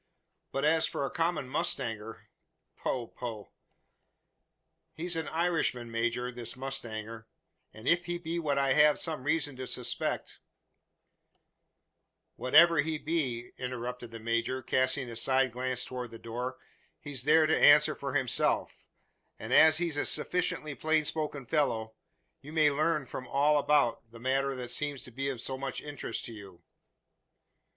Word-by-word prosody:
But 135 - -1
as 160 +1 +3
for 140 - -3
a - - -4
common 165 -5 -1
mustanger 115 -4 -2 0.5
poh 125 -2 -2
poh!" 115 -3 -8 1.4
"He's 175 +2 -2
an 160 -1 -3
Irishman, 160 -8 0
major, 120 +2 -1
this 120 -2 -5
mustanger; 115 -4 -5 0.4
and 110 +3 -11
if 175 +1 +3
he 175 0 -2
be 170 0 -3
what 145 -4 0
I 135 -1 +3
have 150 +1 +5
some 155 -6 -2
reason 150 -2 0
to 130 0 -5
suspect - - -2 1.3
" - - -53
"Whatever 165 +5 +5
he 155 +2 0
be," 135 -7 -2
interrupted 125 -1 -5
the 115 0 -9
major, 115 +3 -1
casting 130 +1 +1
a 115 - -7
side 130 +2 +2
glance 125 +1 -1
towards 125 -1 -6
the 115 - -10
door, 120 +3 -5 0.4
"he's 140 -4 -3
there 155 +2 +5
to 155 - +3
answer 150 +1 +7
for 140 -1 -5
himself; 125 -3 0 0.5
and - - -4
as 160 0 +7
he's 170 -3 -1
a - - +1
sufficiently 170 -1 +1
plain 155 +1 +1
spoken 150 -4 -2
fellow, 115 -6 0 0.5
you 145 - -11
may 155 -2 +4
learn 155 0 +1
from 130 +1 -7
him - - -15
all 145 +2 +4
about 140 -6 +2
the 115 0 -13
matter 135 +2 0
that 125 -1 -6
seems 145 -4 -1
to 125 - -8
be 135 +3 -2
of 130 -4 -5
so 130 -1 -3
much 135 -2 -3
interest 145 -3 -5
to 115 - -7
you." 100 -5 -12
135 Hz, 155 wpm, -30 LUFS, 120-155 Hz, 1.4 s, answer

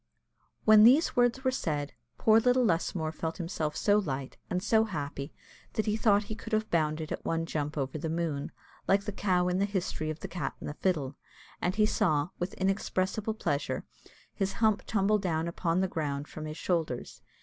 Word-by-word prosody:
When 215 -1 +8
these 265 +8 +6
words 245 +2 +2
were 260 - +2
said, 150 - -2 0.2
poor 220 0 +5
little 250 +2 +3
Lusmore 165 -3 0
felt 160 +1 -4
himself 165 -4 -3
so 205 0 +4
light, 135 -8 -4
and 180 +1 -1
so 220 +1 +4
happy, 145 -6 -5 0.4
that 220 - 0
he 210 -1 +1
thought 210 -2 +3
he 210 - -6
could 225 +1 -8
have 215 0 0
bounded 155 -1 0
at - - -4
one 165 0 -1
jump 150 -1 -3
over 140 +2 -2
the 160 +1 -3
moon, 160 -4 -2 0.4
like 195 +1 +3
the 210 - -3
cow 185 -3 +1
in 180 +1 +1
the 200 - +3
history 185 -6 -2
of 155 0 -5
the - - -4
cat 175 - -4
and - - -7
the 150 - -4
fiddle; 150 -6 -1 0.4
and 180 +2 0
he 215 0 +4
saw, 175 -8 +1
with 175 +2 -3
inexpressible 195 +2 -1
pleasure, 145 -9 -1 0.5
his 195 -1 -1
hump 215 -1 +2
tumble 210 0 +2
down 165 -4 -1
upon 170 +1 0
the 190 - +2
ground 145 -4 -3
from 155 - -7
his 155 +1 -6
shoulders. 160 - -2
180 Hz, 195 wpm, -30 LUFS, 155-210 Hz, 0.5 s, When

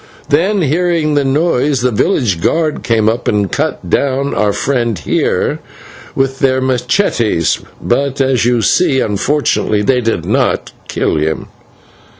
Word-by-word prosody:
Then, 180 +6 +2
hearing 160 0 +1
the 145 -1 +2
noise, 140 -1 +1
the 125 0 +1
village 110 - 0
guard 155 - 0
came 110 -2 +1
up 115 +3 -1
and 105 -3 0
cut - - -2
down 140 0 0
our 105 -1 +1
friend 120 0 -1
here 75 - -1 0.6
with 135 0 -1
their 130 -1 +2
/machetes/, 125 - 0 0.2
but 140 +2 -1
as 130 -2 +2
you 120 -1 +1
see, 150 -2 +2
unfortunately, 105 -1 0
they 125 +3 +2
did 115 -1 -1
not - - 0 0.2
kill - - -1
him." 75 +1 -2
130 Hz, 140 wpm, -14 LUFS, 115-145 Hz, 0.6 s, Then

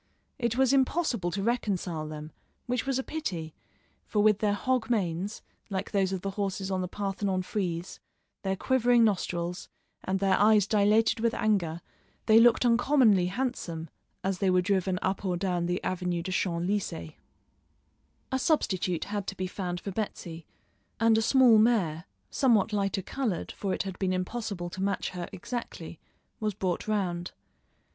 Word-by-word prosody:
It 235 -1 0
was 265 0 +4
impossible 265 - +1
to 195 +3 -3
reconcile 190 -9 -1
them, 155 0 -7 0.3
which 250 +1 -2
was 270 -2 +1
a 265 - -1
pity, 175 - -4 0.5
for 210 -1 +1
with 210 -1 +4
their 205 -1 +1
hog 250 +1 0
manes, 195 -2 -1 0.3
like 195 0 -3
those 195 -2 +1
of 190 -2 -3
the 195 - -3
horses 195 -1 -3
on 185 -1 0
the 180 - -2
Parthenon 195 -1 -2
frieze, 180 -3 -3 0.4
their 190 -1 -1
quivering 245 +1 +3
nostrils, 180 -4 -1 0.3
and 190 +1 0
their 195 -1 +2
eyes 210 -1 +5
dilated 215 +2 +3
with 230 0 +1
anger, 175 -6 0 0.4
they 220 +1 +7
looked 240 +1 +5
uncommonly 235 -6 +4
handsome 180 - -3 0.3
as 190 -1 -1
they 195 - +2
were 185 0 +4
driven 190 -1 +1
up 190 +1 -1
or 180 -2 0
down 175 -2 -1
the 180 +1 0
Avenue 180 -2 -1
des 185 - -4
Champs 175 -2 0
Élysées. 185 -5 -2 1.2
A 265 - +1
substitute 185 - +1
had 205 -1 -4
to 195 - -4
be 185 - -2
found 180 -1 -4
for 200 - -5
Betsy, 175 -5 -5 0.5
and 225 -1 +5
a 220 - +3
small 240 -1 +6
mare, 190 -8 +2 0.3
somewhat 225 -5 +3
lighter 195 -2 0
coloured, 235 -9 -2
for 195 - -3
it - - -1
had 190 -2 -6
been 185 -1 +1
impossible 185 -1 -3
to 185 - -6
match 200 +1 -1
her 180 -2 -6
exactly, 235 +6 -6 0.4
was 215 -3 -1
brought 185 -1 -2
round. 180 -5 -1
195 Hz, 165 wpm, -28 LUFS, 180-225 Hz, 1.2 s, they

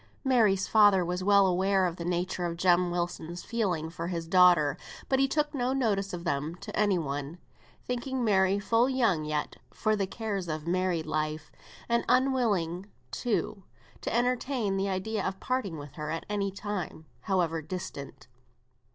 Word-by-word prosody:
Mary's 220 -8 +3
father 205 -4 +5
was 180 +1 -2
well 200 0 +5
aware 190 +1 +2
of 175 -1 -2
the 170 - -5
nature 180 +1 -2
of 170 -1 -3
Jem 180 0 +3
Wilson's 175 0 -3
feelings 180 -9 -2
for 170 0 -4
his 170 -2 -4
daughter, 175 -5 +5 0.3
but 265 - +2
he 270 - +4
took 295 +1 0
no 255 -2 0
notice 205 -7 0
of 175 -1 -5
them 150 0 -2
to - - -8
any 205 -3 +3
one, 145 0 -4 0.5
thinking 250 +1 -2
Mary 195 -3 +3
full 230 +5 +2
young 230 - +1
yet 150 -1 -3
for 215 -1 0
the 195 -2 -1
cares 200 -3 -4
of 155 -1 -4
married 180 -2 0
life, 155 0 -3 0.4
and 235 0 +1
unwilling, 220 -9 +1 0.2
too, 215 -4 -2 0.4
to - - -3
entertain 245 -3 0
the 195 +1 0
idea 195 +2 -2
of 190 0 -3
parting 235 -10 -2
with 145 -2 -9
her 150 -1 -5
at 165 +1 -3
any 205 -1 -1
time, 195 -5 -5 0.2
however 175 -5 +1
distant. 150 -4 -7
190 Hz, 165 wpm, -29 LUFS, 170-220 Hz, 0.5 s, father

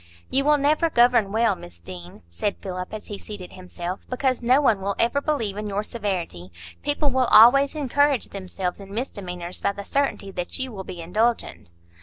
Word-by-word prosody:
"You 275 +1 +2
will 300 0 +5
never 305 +4 +2
govern 240 -6 +4
well, 225 -1 +2
Miss 85 - -12
Deane," 85 0 -10
said 200 - -2
Philip, 185 -1 -5
as 215 -1 -7
he 205 -2 -7
seated 200 -4 -9
himself, 180 0 -6
"because 255 0 0
no 250 +3 +4
one 225 -9 +3
will 200 +1 -1
ever 240 +5 +2
believe 230 -10 -1
in 210 0 -4
your 205 +1 -1
severity. 180 - -4 0.3
People 290 0 +1
will 260 -1 +2
always 275 +6 +7
encourage 285 -2 +1
themselves 185 -1 -4
in 195 0 -10
misdemeanours 180 -7 -5
by 200 - +1
the 200 0 -8
certainty 275 -8 -1
that 180 -2 -3
you 260 -1 -3
will 195 -3 -7
be 175 -2 -8
indulgent." 220 - -1
210 Hz, 185 wpm, -24 LUFS, 185-260 Hz, 0.3 s, always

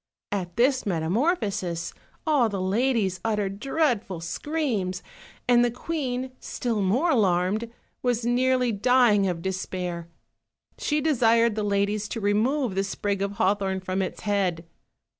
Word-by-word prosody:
At 180 -4 -3
this 255 +2 +3
metamorphosis 190 - -1 0.3
all 285 -8 +3
the 200 -2 -3
ladies 200 -1 +1
uttered 205 -3 -1
dreadful 245 - 0
screams, 195 - -2 0.4
and 240 -1 +5
the 240 - +3
queen, 255 -1 -3
still 230 -4 -2
more 245 - +2
alarmed, 205 - +1 0.3
was 245 -2 0
nearly 250 0 +2
dying 220 -2 +4
of 170 -2 -3
despair; 180 -2 -3 0.7
she 300 0 0
desired 235 -6 +3
the 215 - -2
ladies 205 +1 0
to 230 - -3
remove 225 +4 +1
the 195 +1 0
sprig 200 0 -2
of 200 0 -1
hawthorn 195 -1 +1
from 185 +1 -2
its 185 - -4
head. 190 -5 0
210 Hz, 130 wpm, -26 LUFS, 190-250 Hz, 0.7 s, and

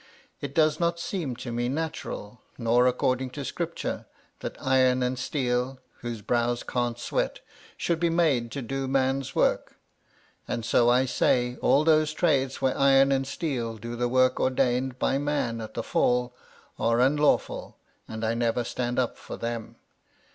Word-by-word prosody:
It 140 -1 -6
does 155 -1 +3
not 170 0 0
seem 165 -7 -3
to 120 0 -6
me 120 +1 -1
natural, 130 -7 -4 0.2
nor 120 +1 +3
according 130 +1 0
to 140 - -4
Scripture, - - -4 0.3
that - - -6
iron 130 -1 +3
and 125 0 -1
steel 125 -1 -1 0.2
(whose 115 -3 -6
brows 120 +2 0
can't 120 -1 -1
sweat) 120 - -2 0.4
should 170 -2 0
be 170 0 +2
made 155 -9 +2
to 140 - -4
do 135 +3 -3
man's 135 0 0
work. - - +1 0.7
And 115 -2 -3
so 120 +1 +4
I 125 +2 +4
say, 125 -1 +1
all 145 - +4
those 155 -1 +3
trades 135 -6 +1
where 130 -1 +2
iron 135 0 +5
and 135 -1 +1
steel 125 -7 -3
do 115 +2 -6
the 120 0 0
work 130 0 +3
ordained 130 0 +1
to 135 - +1
man 140 -6 -1
at 110 - -8
the - - -2
Fall, 125 0 +1 0.5
are 115 +1 +2
unlawful, 145 +3 +1 0.3
and 110 0 -4
I 110 - +1
never 120 +1 0
stand 120 +1 -3
up 125 -2 0
for - - -8
them. 115 -1 -5
130 Hz, 160 wpm, -27 LUFS, 120-135 Hz, 0.7 s, iron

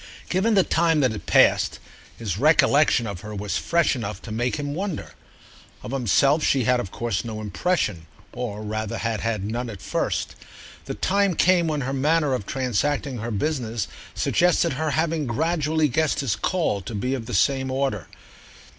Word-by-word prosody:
Given 210 +5 +2
the 195 - +5
time 165 -3 +2
that 130 -3 +3
had 105 - -7
passed, - - +4 0.4
his 100 -5 -3
recollection 150 -3 +4
of 100 -5 -5
her 105 0 -7
was 100 0 -2
fresh 170 -4 +2
enough 105 -6 -5
to 110 - -8
make 120 +3 -1
him 145 -1 -3
wonder. 190 0 -4 0.7
Of - - -6
himself 135 +4 +2
she 135 -2 +2
had 125 +2 +3
of 100 - -4
course 115 -1 -2
no 110 -2 -5
impression, 105 - -1 0.3
or 110 -4 -5
rather 110 0 -3
had 115 -2 -2
had 110 -4 -2
none 120 +3 -3
at 105 -4 -8
first: - - -2 0.5
the - - -5
time 200 -2 +1
came 175 -1 +3
when 150 -2 -1
her 135 +1 -2
manner 150 +1 +2
of 115 -6 -3
transacting 135 +1 -1
her 115 +2 -4
business 115 -1 -2 0.3
suggested 170 -2 +2
her 155 +4 -1
having 160 0 0
gradually 155 +4 +1
guessed 155 +3 +1
his 135 -6 0
call 160 - 0
to 105 +4 -7
be 125 +6 -1
of 120 -4 -4
the 120 - -3
same 130 +6 +2
order. 130 - -1
130 Hz, 175 wpm, -24 LUFS, 110-155 Hz, 0.7 s, the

